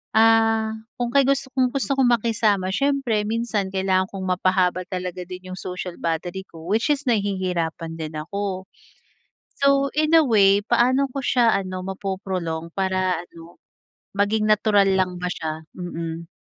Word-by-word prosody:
ah, 225 Hz, 0 st, +4 dB, 0.3 s
kung 240 Hz, -1 st, 0 dB
kay 275 Hz, -, +6 dB
gusto 275 Hz, -1 st, +1 dB
kong 255 Hz, -2 st, +2 dB
gusto 275 Hz, 0 st, 0 dB
kong 260 Hz, -2 st, +4 dB
makisama 215 Hz, -4 st, +1 dB
siyempre 275 Hz, -6 st, +1 dB
minsan 220 Hz, -4 st, -1 dB
kailangan 190 Hz, 0 st, +1 dB
kong 190 Hz, -1 st, -5 dB
mapahaba 185 Hz, 0 st, +1 dB
talaga 180 Hz, -1 st, -4 dB
din 185 Hz, 0 st, -9 dB
'yung -, -, -7 dB
social 180 Hz, -1 st, -5 dB
battery 175 Hz, +3 st, -2 dB
ko 165 Hz, 0 st, -12 dB
which 220 Hz, +8 st, +1 dB
is 285 Hz, +1 st, -5 dB
nahihirapan 180 Hz, -6 st, -1 dB
din 155 Hz, 0 st, -5 dB
ako. 190 Hz, +3 st, -4 dB, 0.9 s
So 275 Hz, 0 st, +3 dB
in 310 Hz, +1 st, +1 dB
a 315 Hz, -, +5 dB
way, 200 Hz, -4 st, +5 dB
paano 255 Hz, +3 st, +3 dB
ko 275 Hz, -, -3 dB
siya 240 Hz, -3 st, +3 dB
ano 185 Hz, -1 st, -3 dB
mapo-prolong 185 Hz, -4 st, -4 dB
para 185 Hz, -2 st, 0 dB
ano 170 Hz, -1 st, -15 dB, 0.6 s
maging 210 Hz, +2 st, +1 dB
natural 205 Hz, -2 st, +4 dB
lang 185 Hz, -1 st, 0 dB
ba 180 Hz, -, -1 dB
siya? 160 Hz, 0 st, -5 dB
Mm. 165 Hz, -2 st, -5 dB
195 Hz, 150 wpm, -23 LUFS, 180-225 Hz, 0.9 s, kay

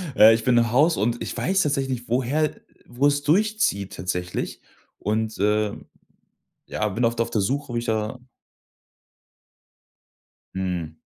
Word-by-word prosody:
Ja, 110 Hz, +1 st, +9 dB
ich 115 Hz, 0 st, +2 dB
bin 125 Hz, -1 st, +3 dB
im 115 Hz, -1 st, +3 dB
Haus, 155 Hz, +6 st, +4 dB
und 115 Hz, +3 st, 0 dB
ich -, -, -4 dB
weiß 195 Hz, +1 st, +1 dB
tatsächlich 135 Hz, -5 st, -1 dB
woher 135 Hz, +5 st, +1 dB, 0.3 s
wo 125 Hz, +4 st, 0 dB
es 145 Hz, 0 st, +1 dB
durchzieht 185 Hz, -, +1 dB
tatsächlich. 90 Hz, -1 st, -3 dB, 0.4 s
Und, 110 Hz, +1 st, -2 dB
äh, 105 Hz, 0 st, +2 dB, 0.9 s
ja, 110 Hz, -, -2 dB
bin 115 Hz, +5 st, -2 dB
oft 115 Hz, 0 st, 0 dB
auf 115 Hz, -, -1 dB
der 110 Hz, -3 st, 0 dB
Suche, 135 Hz, +5 st, -2 dB
wo -, -, -3 dB
ich 115 Hz, -, -1 dB
da 110 Hz, +2 st, -2 dB, 2.4 s
Mhm. 90 Hz, -4 st, -3 dB
115 Hz, 140 wpm, -24 LUFS, 105-135 Hz, 2.4 s, Ja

